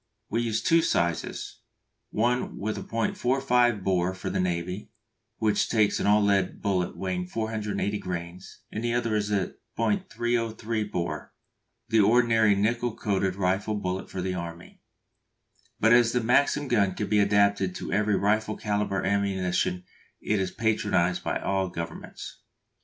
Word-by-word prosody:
We 115 - +1
use 115 -2 -1
two 165 0 +4
sizes, 85 - -1 0.5
one 120 +3 0
with 105 +2 -4
.45 120 -1 +1
bore 95 -1 +1
for - - -4
the - - -1
Navy, 90 +2 -2 0.5
which 105 -2 +1
takes 110 -3 +2
an - - 0
all 105 +1 +5
lead 100 -2 +1
bullet 95 -3 -1
weighing 90 -1 -2
480 105 -1 -2
grains, 90 0 -7
and 110 - -4
the 120 0 0
other 120 -2 0
with 105 -1 0 0.5
.303 115 - -1
bore, 85 -3 -4 0.5
the 110 0 +4
ordinary 110 -1 +4
nickel 115 +3 0
coated 95 -2 0
rifle 95 +3 0
bullet 95 -2 -3
for 90 - -4
the 95 0 -1
Army. 85 -1 -7 1.0
But 110 +2 +5
as 120 -1 +5
the 125 - +2
Maxim 140 +4 +2
gun 100 -6 +2
can 105 - -2
be 105 - +3
adapted 100 -2 +3
to - - -5
every 105 +1 +2
rifle 110 +2 +1
calibre 105 -2 -1
ammunition 95 -2 0 0.4
it 105 - 0
is 95 -1 0
patronised 105 -5 0
by - - -1
all 95 -1 -1
governments. 85 -2 -7
105 Hz, 140 wpm, -27 LUFS, 95-115 Hz, 1.0 s, all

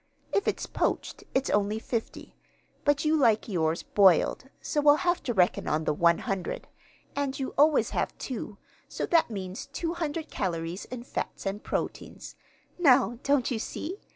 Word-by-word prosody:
If 400 - +1
it's - - 0
poached - - -2
it's 265 +1 +1
only 205 +1 +1
50; 225 0 -5 0.5
but 290 +1 +2
you 310 +1 +3
like 230 -8 +3
yours 165 -5 0
boiled, 195 +3 +4
so 295 - -1
we'll 290 0 +7
have 350 0 +2
to 245 - -2
reckon 180 -2 +2
on 155 +1 0
the 150 - +1
100. 170 +3 0 0.5
And 275 -1 -1
you 265 - -3
always 300 +2 +4
have - - -2
two, 220 -5 -6 0.3
so - - -3
that 330 -5 +3
means 190 -3 -6
200 325 +1 -3
calories 170 -1 -3
in 245 -1 -7
fats - - -5
and 195 +2 -3
proteins. - - -4 0.4
Now, 245 - +4
don't 280 -2 +2
you 230 - -1
see? 355 - -5
240 Hz, 155 wpm, -28 LUFS, 195-290 Hz, 0.5 s, we'll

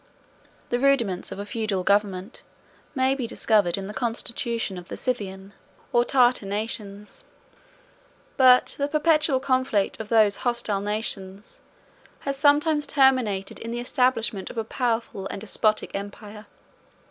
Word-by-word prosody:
The 245 - 0
rudiments 240 -9 +1
of - - -6
a 200 - -5
feudal 210 -3 -2
government 200 +1 0 0.5
may 260 0 +2
be 260 -4 -3
discovered 210 -6 +1
in 195 - -5
the 205 - -7
constitution 230 -2 -3
of 175 - -13
the - - -7
Scythian 200 -5 -4 0.4
or 240 - +4
Tartar 245 -4 +2
nations; 210 - -5 1.1
but 255 -1 +5
the 280 - +1
perpetual 305 -2 +2
conflict 255 -6 0
of 220 -1 -7
those 215 -3 +4
hostile 235 -5 -1
nations 205 -1 -4 0.6
has 275 0 -2
sometimes 295 +2 +3
terminated 255 -8 +2
in 230 - -6
the 240 +1 -3
establishment 240 -5 0
of - - -10
a 225 - 0
powerful 225 -4 -2
and - - -6
despotic 215 +1 0
empire. 205 +1 -8
225 Hz, 135 wpm, -24 LUFS, 200-255 Hz, 1.1 s, but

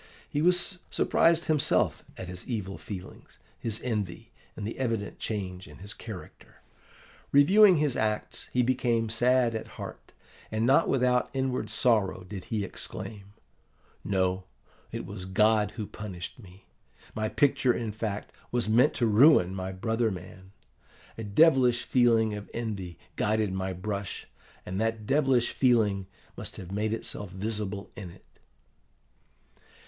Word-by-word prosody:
He 145 - -1
was 180 +2 +2
surprised 170 +1 +3
himself 155 -3 +2
at 95 - -6
his 90 0 -8
evil 105 -6 -4
feelings, 95 -3 -9 0.2
his 110 -2 -2
envy, 110 -1 -3 0.2
and 105 - -5
the 110 - -5
evident 115 -5 -2
change 95 -4 -4
in - - -13
his 100 +3 -7
character. 110 -6 -11 0.7
Reviewing 185 +8 +7
his 150 -5 +1
acts, 105 -1 -2
he 125 - +2
became 120 -2 +1
sad 120 +1 +3
at 110 - -6
heart; - - -8 0.4
and 110 +1 0
not 130 - +4
without 125 -1 +2
inward 130 -4 -1
sorrow 110 -5 +2
did 95 -1 -7
he 105 -3 -2
exclaim, 100 +1 -7 0.7
'No, 95 -1 0 0.5
it - - -5
was 100 -2 -6
God 105 +2 +3
who 110 -3 -3
punished 100 0 -7
me! 95 -3 -15 0.5
my 110 0 -1
picture, 135 -1 +3
in 115 -2 -2
fact, 105 -1 -4 0.2
was 120 -2 0
meant 120 +7 +4
to 120 - +1
ruin 110 - +6
my 95 0 -4
brother 110 +4 0
man. 95 0 -9 0.6
A 115 - -6
devilish 125 +2 +4
feeling 115 -3 +3
of 105 0 -7
envy 100 -7 -4 0.2
guided 105 -2 +1
my 95 0 -2
brush, 100 +2 -4 0.4
and 95 +3 -3
that 110 -1 -1
devilish 135 -2 +3
feeling 105 -7 +2 0.3
must - - -7
have 95 -1 -8
made 105 +2 -1
itself 105 -3 -3
visible 105 +1 -4
in 95 -4 -7
it. 85 - -16
110 Hz, 140 wpm, -28 LUFS, 100-120 Hz, 0.7 s, Reviewing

